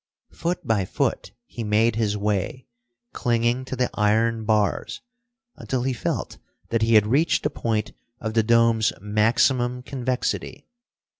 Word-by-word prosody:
Foot 170 +2 -3
by 110 -4 +1
foot - - -2
he 120 - -7
made 110 +2 +2
his 105 -2 0
way, 105 +4 -2 0.5
clinging 120 +2 0
to 130 - -5
the 125 0 0
iron 110 +1 +1
bars, 105 -2 0 0.6
until 130 -2 -2
he 130 0 0
felt 120 - -3 0.3
that 115 -1 0
he 115 0 +3
had 105 -1 +6
reached 140 +10 +2
the - - 0
point 110 -2 -2 0.3
of 110 -1 -4
the 115 - +4
dome's 115 -1 +3
maximum 120 +4 +1
convexity. 130 +1 -3
115 Hz, 140 wpm, -24 LUFS, 110-125 Hz, 0.6 s, had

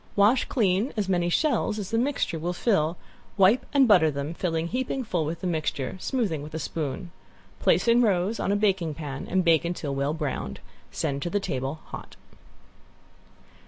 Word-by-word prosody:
Wash 210 +5 +4
clean 210 0 +1
as 205 -3 0
many 175 -2 +1
shells 275 - +1
as 205 -3 -5
the 225 - +1
mixture 250 - -1
will 175 +3 -2
fill, 175 -5 +1 0.4
wipe 195 +5 +4
and 275 -3 +5
butter 180 -7 +6
them, 140 +2 -3
fill 170 -1 -2
heaping 250 +11 -2
full 175 -8 -1
with 165 +2 -4
the - - -4
mixture, 155 -5 -2
smoothing 200 - -1
with 150 +2 -8
a - - -1
spoon. 155 +1 -4 0.5
Place - - +3
in 235 +1 +5
rows 200 0 +1
in - - 0
a - - +3
baking 190 -7 +1
pan 140 -3 -6
and 185 0 +1
bake 165 -1 +4
until 170 -4 -3
well 140 +2 -1
browned. 135 - -4 0.3
Send 140 0 -2
to 175 - -2
the 205 - 0
table 135 -3 -3
hot. - - -9
175 Hz, 180 wpm, -26 LUFS, 155-210 Hz, 0.5 s, butter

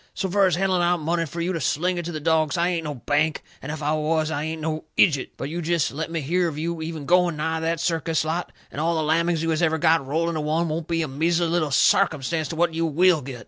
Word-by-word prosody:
So 195 - -1
fur 200 0 +4
as 180 - +1
handing 185 -1 +1
out 175 0 +2
money 165 +2 -1
fur 170 +4 -5
you 180 +2 -1
to 165 - -3
sling 175 +7 0
it 175 - -5
to 175 - -4
the 155 - -4
dogs, 155 +1 +1
I 170 +1 +2
ain't 170 -3 -2
no 150 -1 -4
bank, 150 +5 0 0.2
and 145 - -5
if 155 -1 -6
I 150 +1 +1
was 155 0 0
I 145 -2 -2
ain't 160 0 -4
no 155 0 -3
ijut. 145 -6 +3
But - - -4
you 170 +3 -4
jest 170 -2 0
let 155 +4 -4
me 165 -1 -3
hear 175 +5 +1
of 155 -3 -5
you 165 +1 -3
even 160 -2 -5
going 175 -1 +3
nigh 160 +1 -1
that 165 0 -1
circus 165 -2 0
lot 165 +2 -2 0.2
and 145 - -4
all 165 +1 +1
the 160 - 0
lammings 165 +1 +1
you 165 - 0
has 155 - 0
ever 160 -1 +2
got, 160 -1 +3
rolled 160 +5 -1
into 160 -2 -2
one, 160 +3 0
won't 160 +1 -3
be 165 -1 0
a - - -3
measly 165 +5 +1
little 165 -2 0
sarcumstance 150 +3 +2
to 165 - -5
what 170 0 +1
you 165 +1 0
WILL 170 +1 +3
get. 130 -2 -8
160 Hz, 275 wpm, -24 LUFS, 155-170 Hz, 0.2 s, fur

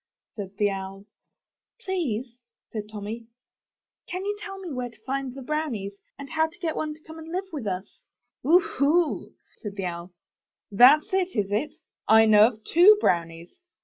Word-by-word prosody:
'' - - -68
said 200 -2 -7
the 205 - +3
Owl. 195 0 -5 0.8
'Tlease," 260 - -3 0.3
said 210 -1 -5
Tommy, 220 +2 -7 0.8
*'can 365 +2 -4
you 410 0 -1
tell 390 -2 -7
me 370 -4 -7
where 250 -2 -3
to 225 -2 -21
find 270 -1 -3
the 270 - -8
brownies, 255 -9 -2 0.3
and 280 - -8
how 320 0 +2
to 330 +2 -15
get 335 -4 -3
one 305 -1 -3
to - - -19
come 320 0 -11
and 320 - -10
live 370 +2 -2
with 270 -9 -4
us?" 190 +1 -5 0.4
'^Oohoo!" 320 0 +2 0.3
said 205 -2 -6
the 195 -2 -3
Owl, 170 0 -5 0.6
''that's 260 - +6
it, 375 -1 0
is 200 -3 -1
it? 220 +9 -1 0.3
I 220 0 +7
know 215 0 +7
of 220 -3 -7
two 375 - +7
brownies." 170 - -1
250 Hz, 175 wpm, -26 LUFS, 205-320 Hz, 0.8 s, I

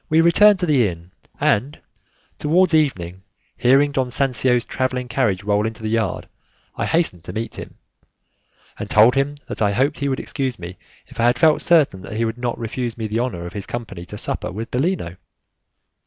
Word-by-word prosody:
We 160 0 +4
returned 200 +5 +6
to - - +2
the 135 -9 +3
inn, 85 0 -8 0.3
and, 130 +9 +1 0.6
towards 175 +4 +2
evening, 95 - 0 0.3
hearing 135 +4 +3
Don 130 -3 -1
Sancio's 125 -1 +1
travelling 130 -1 -2
carriage 115 -6 0
roll 105 +1 +1
into 110 0 -8
the 110 - -2
yard, 110 -6 -1 0.5
I - - -2
hastened 160 - 0
to - - -7
meet 115 +1 -5
him, - - -9 1.0
and - - -5
told 110 +4 +6
him 140 +1 0
that - - -6
I 100 -1 +2
hoped 135 +7 0
he 140 0 -1
would 130 - -1
excuse 130 -5 -3
me 90 0 -9 0.3
if - - -15
I 115 - +3
had 120 - +3
felt 160 -2 +4
certain 150 - +3
that 95 - -8
he 115 - +1
would 115 +2 -4
not 120 -1 -2
refuse 120 0 -4
me 110 - -4
the 110 +2 -2
honour 110 -9 -3
of 85 - -8
his 100 -2 -5
company 110 -7 -6
to 105 - -8
supper - - -3
with 110 +6 -6
Bellino. 130 - -1
120 Hz, 195 wpm, -21 LUFS, 105-140 Hz, 1.0 s, returned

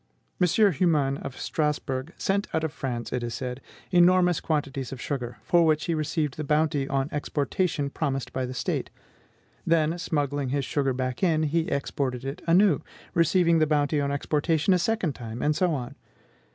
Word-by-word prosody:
M. 180 - +5 0.2
Humann, 145 -5 +2
of 125 - -7
Strasbourg, 150 -2 -2
sent 200 +1 0
out 160 - 0
of 160 -2 -2
France, 125 -5 -4
it 125 - -1
is 120 -1 -4
said, 125 0 -5 0.3
enormous 180 -1 +5
quantities 140 -4 -2
of 135 - -6
sugar, 125 -2 -4
for 175 -1 +4
which 155 -1 +2
he 170 - 0
received 155 -2 -1
the 155 - -3
bounty 150 -1 +1
on 135 -1 0
exportation 145 0 -1
promised 135 -4 -2
by 130 -1 -2
the 130 - -6
State; - - -2 0.7
then, 165 +1 +2
smuggling 145 -4 -1
this 140 0 -1
sugar 135 -1 0
back 130 0 -3
again, 160 -4 +2
he 160 +2 0
exported 135 -2 -2
it 135 +1 -5
anew, 175 -2 +4 0.3
receiving 170 0 +3
the 155 - +3
bounty 145 -1 +1
on 140 0 -1
exportation 155 +4 +1
a 180 - +3
second 185 -4 0
time, 115 -2 -7
and 150 0 +2
so 180 +1 +2
on. 135 -3 -3
150 Hz, 175 wpm, -26 LUFS, 135-165 Hz, 0.7 s, M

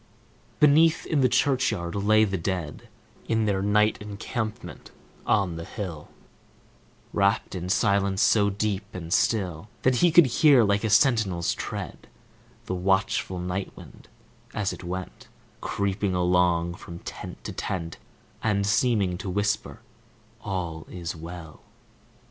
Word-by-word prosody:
Beneath, 155 +2 +5
in 150 -3 +1
the 130 - +4
churchyard, 125 -12 +1
lay 110 +2 +3
the 100 -3 0
dead, 85 -4 -4 0.4
In 110 -1 +1
their 100 -2 0
night 105 +2 +2
encampment 105 +2 -5 0.4
on 95 -6 +1
the 85 - -5
hill, 85 -5 -6 1.1
Wrapped 100 0 +1
in 90 -1 -5
silence 100 -1 +2
so 105 -2 +4
deep 100 0 -1
and 85 -2 -4
still 95 -4 0
That 130 -1 +3
he 175 +6 +4
could 175 0 +7
hear, 130 0 +5
like 100 0 +1
a 110 - 0
sentinel's 110 - +3
tread, - - -6 0.6
The - - -3
watchful 95 0 0
night 90 +2 -4
wind, - - -14 0.5
as 100 -2 -1
it - - -10
went 90 +1 -6 0.3
Creeping 100 -1 -1
along 90 -1 +2
from 85 - -9
tent - - -9
to - - -5
tent 85 -3 -4 0.4
And 100 -2 +1
seeming 105 -4 +1
to 100 - -5
whisper, 100 +3 -1 0.6
"All 85 -6 -4
is 85 -2 -5
well!" 80 -1 -9
100 Hz, 130 wpm, -26 LUFS, 90-110 Hz, 1.1 s, could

